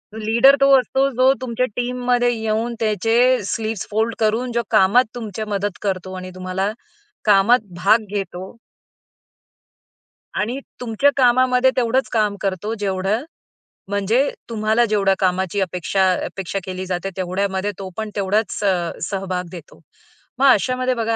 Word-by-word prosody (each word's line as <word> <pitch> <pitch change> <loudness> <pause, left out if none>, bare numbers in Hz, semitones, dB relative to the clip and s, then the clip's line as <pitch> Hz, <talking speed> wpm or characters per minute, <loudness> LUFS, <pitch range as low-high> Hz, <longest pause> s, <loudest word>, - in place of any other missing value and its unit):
Leader 235 +6 +5
तो 275 - +5
असतो 270 +2 0
जो 260 +1 +5
तुमच्या 255 0 -1
टीममध्ये 245 0 0
येऊन 225 +1 -2
त्याचे 225 +1 +1 0.3
स्लीव्स 220 -2 -3
फोल्ड 220 +2 0
करून 225 +3 0
जो 235 0 0
कामात 200 +7 +5
तुमची 220 -2 -5
मदत 205 -2 -2
करतो 190 -2 -3
आणि 185 0 -7
तुम्हाला 185 +2 -2 0.5
कामात 210 +4 +5 0.2
भाग 215 +2 +4
घेतो 190 -2 -5 1.9
आणि 240 +6 -2 0.2
तुमच्या 245 +4 +2
कामामध्ये 255 0 +4
तेवढंच 250 +2 +1
काम 210 -3 +1
करतो 195 +2 -2
जेवढं 195 +4 -1 0.7
म्हणजे 210 +7 +1 0.2
तुम्हाला 220 +1 +1
जेवढ्या 200 -3 +2
कामाची 190 +1 0
अपेक्षा 185 +1 +1
अपेक्षा 195 +1 -4
केली 185 0 -5
जाते 185 +1 -3
तेवढ्यामध्ये 190 +2 -1
तो 190 -1 -6
पण 220 -1 -3
तेवढाच 205 +2 0
अ, 180 -4 +1
सहभाग 185 -1 -3
देतो. 170 -4 -12 0.6
मग 275 - +4
अशामध्ये 255 +2 +2
बघा 230 -1 -1
215 Hz, 130 wpm, -20 LUFS, 190-240 Hz, 1.9 s, Leader